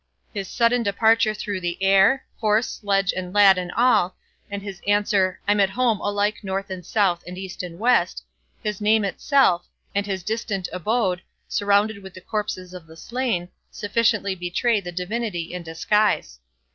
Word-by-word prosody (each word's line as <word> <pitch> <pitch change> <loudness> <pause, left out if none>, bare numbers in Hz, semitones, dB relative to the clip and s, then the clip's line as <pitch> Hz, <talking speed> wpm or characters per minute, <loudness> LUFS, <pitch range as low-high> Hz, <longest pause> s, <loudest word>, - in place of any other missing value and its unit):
His 200 -3 -4
sudden 240 0 +2
departure 220 +1 +3
through 205 -2 -4
the 175 -1 -2
air, 195 +7 +4
horse, 220 +1 +2
sledge, 195 -2 0
and 180 -1 -4
lad, 195 -2 +7
and 180 -1 -5
all, 230 -7 +3 0.3
and 200 -1 -5
his 195 -3 -8
answer 205 -2 +2
"I'm 205 0 +3
at 195 -1 +4
home, 230 0 +1
alike 205 +1 0
north, 195 0 -4
and 185 -1 -6
south, 185 -2 +1
and 180 +1 -7
east, 190 -1 -6
and 175 -2 -8
west"; 180 - +2 0.4
his 210 -1 -3
name 215 0 +3
itself, 195 -2 +2 0.3
and 200 0 -1
his 190 -3 -3
distant 210 -3 -2
abode, 185 0 0 0.3
surrounded 205 +1 +1
with 190 -1 -11
the 185 - -10
corpses 185 -4 -4
of 180 -3 -10
the 160 0 -14
slain, 235 -5 -2 0.2
sufficiently 210 -1 0
betray 190 +5 0
the 175 -2 -6
divinity 180 -1 -3
in 180 - -4
disguise. 165 - 0
200 Hz, 165 wpm, -23 LUFS, 180-215 Hz, 0.4 s, lad